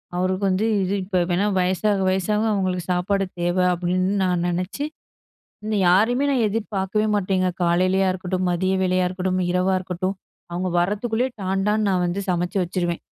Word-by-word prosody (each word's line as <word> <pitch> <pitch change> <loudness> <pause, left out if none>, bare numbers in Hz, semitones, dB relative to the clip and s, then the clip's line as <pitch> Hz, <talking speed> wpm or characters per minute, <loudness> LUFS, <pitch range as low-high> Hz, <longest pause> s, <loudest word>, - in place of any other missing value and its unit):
அவருக்கு 185 +2 -1
வந்து 190 +4 +1 0.2
இது 185 +1 -1
இப்ப 185 -1 0
வேணா. 180 +3 +1
வயசாக 190 +3 +1
வயசாக 210 +3 0
அவங்களுக்கு 185 -3 -1
சாப்பாடு 195 +2 0 0.2
தேவ 175 +1 0 0.2
அப்டின்னு 185 +2 0
நான் 180 -2 +1
நெனச்சு, 180 +11 -2 0.8
இந்த 215 0 -1
யாரையுமே 230 +9 +3
நான் 255 -5 +2
எதிர்பார்க்கவே 210 -1 -1
மாட்டேங்க. 185 -2 +1
காலையிலேயா 185 +2 +2
இருக்கட்டும், 185 0 -2
மதிய 185 +2 0
வேளையா 185 0 +2
இருக்கட்டும், 185 0 -1
இரவா 185 +1 +1
இருக்கட்டும், 185 +1 -3 0.4
அவங்க 180 +1 -2
வரத்துக்குள்ளே 220 +7 0
டான் 190 +1 -1
டான்னு 210 0 +1
நான் 180 -2 +1
வந்து 185 +3 -2
சமைச்சு 180 +3 -1
வச்சுருவேன். 175 -1 -2
185 Hz, 150 wpm, -22 LUFS, 180-200 Hz, 0.8 s, யாரையுமே